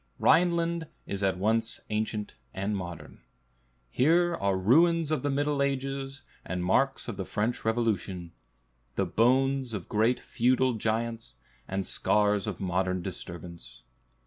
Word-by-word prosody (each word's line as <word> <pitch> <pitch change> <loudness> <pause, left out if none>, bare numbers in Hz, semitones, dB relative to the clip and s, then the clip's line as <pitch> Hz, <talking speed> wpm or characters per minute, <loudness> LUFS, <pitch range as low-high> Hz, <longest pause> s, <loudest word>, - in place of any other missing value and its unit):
Rhineland 170 -1 +3 0.2
is 100 0 -4
at 95 -2 +1
once 115 +4 +1
ancient 105 0 -2 0.2
and 100 +2 -1
modern. 90 -3 -7 0.7
Here 170 +6 +3
are 100 - 0
"ruins 160 - +4
of 155 - +1
the 145 - -1
Middle 145 +1 0
Ages, 135 0 -2 0.2
and 90 0 -3
marks 135 +9 +1
of - - -5
the 95 - -2
French 110 +4 -1
Revolution; 105 -6 -1 0.6
the - - +1
bones 130 +1 +2
of 95 - -6
great 110 +4 +2
feudal 130 +1 +2
giants, 115 - -2 0.3
and 95 0 -2
scars 105 +1 +1
of 100 -5 -4
modern 95 -1 -1
disturbance." 85 -7 -8
110 Hz, 130 wpm, -28 LUFS, 95-135 Hz, 0.7 s, ruins